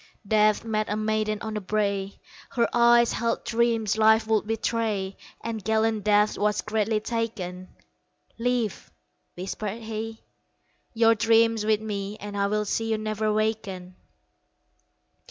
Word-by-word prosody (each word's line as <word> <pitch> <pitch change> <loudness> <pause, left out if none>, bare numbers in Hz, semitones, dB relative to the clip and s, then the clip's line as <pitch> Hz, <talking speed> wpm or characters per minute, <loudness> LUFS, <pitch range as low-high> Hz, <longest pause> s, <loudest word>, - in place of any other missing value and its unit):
Death 215 0 +3
met 215 -1 -1
a 210 - 0
maiden 215 0 0
on 220 -1 -4
the 210 - -3
brae, 200 -1 -1 0.3
Her 235 -3 +1
eyes 235 0 +5
held 230 0 -1
dreams 225 -2 +1
life 220 0 +5
would 220 -1 +1
betray, 220 -3 -1 0.3
And 225 -2 -4
gallant 220 -1 +1
Death 210 0 +3
was 210 0 +1
greatly 215 0 0
taken 210 -6 -4 0.7
"Leave," 240 -3 -1 0.5
whispered 205 +4 -5
he, 220 0 -6 0.7
"Your 225 0 +5
dream 225 +1 +4
with 215 0 +2
me 205 -1 -4
And 205 0 -7
I 200 0 +1
will 210 +1 0
see 225 +2 -1
you 220 - +1
never 215 0 -1
waken." 210 -4 -2
215 Hz, 135 wpm, -26 LUFS, 210-225 Hz, 0.7 s, eyes